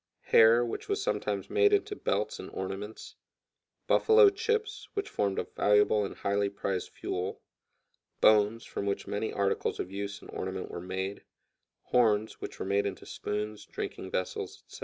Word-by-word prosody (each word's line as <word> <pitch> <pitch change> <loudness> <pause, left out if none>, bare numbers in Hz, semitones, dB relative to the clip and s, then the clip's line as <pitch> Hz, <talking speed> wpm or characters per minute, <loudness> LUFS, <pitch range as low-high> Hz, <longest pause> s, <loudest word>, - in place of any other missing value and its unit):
hair, 115 +2 +6
which 120 - -5
was 405 +1 +1
sometimes 395 - -1
made 425 -1 +4
into 410 0 +1
belts 105 - -1
and - - -7
ornaments; 100 +3 -6 0.7
"buffalo 440 -2 +6
chips," 450 +2 -2
which 405 -1 -1
formed 100 -2 -1
a - - +1
valuable 105 0 +4
and 100 - -5
highly 100 0 0
prized 100 -2 -3
fuel; 90 +2 -4 0.8
bones, 110 +1 +4
from 100 - -4
which 100 - -1
many 105 +2 -2
articles 100 -1 0
of 90 - -4
use 100 0 -4
and - - -12
ornament 95 0 -4
were 85 - -5
made; 95 +2 -4 0.6
horns, 110 -3 +2
which - - -6
were - - -4
made 100 +1 +1
into 95 - -6
spoons, 105 0 -4
drinking 95 - -5
vessels, 95 0 -3
etc. - - -12
105 Hz, 160 wpm, -30 LUFS, 100-120 Hz, 0.8 s, hair